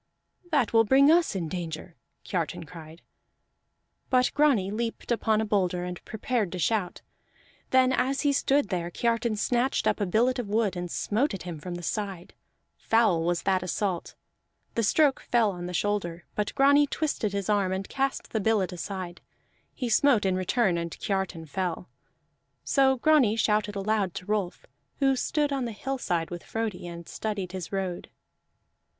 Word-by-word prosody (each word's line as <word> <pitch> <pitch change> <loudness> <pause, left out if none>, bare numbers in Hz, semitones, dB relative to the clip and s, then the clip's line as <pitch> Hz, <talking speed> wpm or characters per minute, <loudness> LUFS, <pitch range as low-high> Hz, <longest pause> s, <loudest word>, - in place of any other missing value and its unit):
"That 280 -10 +1
will 225 0 +6
bring 275 +6 +5
us 335 - +3
in 175 -4 -2
danger!" 165 0 -6 0.3
Kiartan 165 -2 -3
cried. 160 0 -12 1.1
But 255 -1 +3
Grani 265 -11 +3
leaped 230 +2 -4
upon 220 -2 +2
a - - -1
boulder 185 -4 0
and 180 0 -6
prepared 220 -3 -2
to - - -3
shout. 185 0 -1 0.7
Then 260 0 +4
as 270 +2 +1
he 285 -1 +2
stood 280 -3 +2
there, 175 -2 -2
Kiartan 230 +3 0
snatched 245 +5 +1
up - - +1
a 200 - +1
billet 240 +7 +2
of 240 - -3
wood 210 -2 +1
and 175 0 -4
smote 220 - 0
at 190 - -8
him 170 -3 -6
from 175 +4 -6
the 175 - -7
side: 195 -3 -4 0.5
foul 220 -7 +3
was 175 0 0
that 190 -1 +2
assault. 185 0 -2 0.6
The 230 - 0
stroke 280 +5 +3
fell 230 -4 +2
on 175 -1 -6
the - - -5
shoulder, 175 -2 -2
but 210 0 -2
Grani 285 +1 +5
twisted 280 -9 -1
his 200 -1 -3
arm 200 -3 +2
and 190 +1 -3
cast 270 0 -2
the 220 - 0
billet 205 -3 +1
aside; 180 +1 -6 0.5
he 250 - -3
smote 235 -2 +4
in 190 -1 +2
return, 185 -1 +1
and 170 0 -3
Kiartan 190 -4 -2
fell. 180 +2 -3 0.7
So 265 -1 +3
Grani 265 -5 +4
shouted 210 -2 +1
aloud 200 -2 0
to 185 - -6
Rolf, 205 -3 -2 0.3
who 270 -1 +3
stood 290 +2 0
on 270 -3 -1
the 235 - -3
hillside 210 -8 -2
with 175 -1 -6
Frodi 220 -6 -4
and 170 -1 -8
studied 205 -4 -4
his 185 -2 -6
road. 190 -3 -3
205 Hz, 170 wpm, -27 LUFS, 180-245 Hz, 1.1 s, will